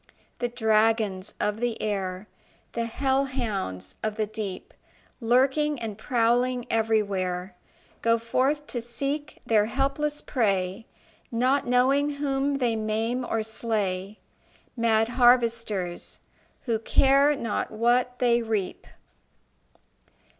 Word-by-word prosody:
The 245 - 0
dragons 220 -4 +1
of 210 +1 -1
the 240 -1 -1
air, 195 -1 -3 0.5
The 230 0 -1
hell 265 +3 +1
hounds 195 - -4
of 215 -1 -2
the 215 -1 0
deep, 210 -3 -6 0.5
Lurking 265 +5 +2
and 225 -3 -4
prowling 245 +2 +1
everywhere, 195 -5 0 0.5
Go 230 0 +3
forth 260 +6 0
to 240 -4 -3
seek 275 +5 -4
their 215 -2 +3
helpless 275 +4 -1
prey, 200 -4 0 0.4
Not 255 +4 +1
knowing 270 +4 +3
whom 280 0 0
they 245 -4 +1
maim 220 +3 -1
or 225 -2 -1
slay 210 -3 -2 0.6
Mad 225 -2 +2
harvesters, 230 -7 +2 0.4
who 230 -4 -1
care 275 +5 +4
not 230 -6 -2
what 245 +3 +1
they 240 -1 +3
reap. 220 -5 -3
230 Hz, 110 wpm, -26 LUFS, 215-255 Hz, 0.6 s, care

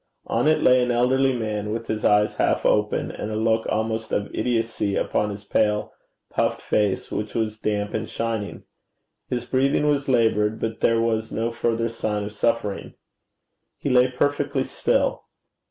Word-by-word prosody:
On - - 0
it 155 - +3
lay 125 0 +6
an 125 - 0
elderly 130 +3 +3
man, 110 -4 -3
with 115 +1 -3
his 110 -1 -3
eyes 105 0 +4
half - - 0
open, 105 0 +1
and 105 - -5
a 110 - -3
look 110 +1 +1
almost 110 0 -2
of 100 - -2
idiocy 115 -4 -1
upon 105 - 0
his 100 0 -7
pale, 105 +1 0 0.4
puffed - - 0
face, 105 -3 0
which 105 0 -4
was 110 -1 -1
damp 105 -1 -1
and 110 0 -3
shining. 115 -3 -3 0.7
His 120 -1 -2
breathing 135 +3 +1
was 145 -1 +1
laboured, 110 -3 +2
but 110 0 -3
there 115 0 +3
was 110 -1 0
no 115 +1 -1
further 115 0 0
sign 110 -2 -2
of 105 - -5
suffering. 105 -2 -1 0.8
He 140 - -2
lay 125 0 +5
perfectly 145 +1 0
still. - - 0
115 Hz, 165 wpm, -24 LUFS, 105-125 Hz, 0.8 s, lay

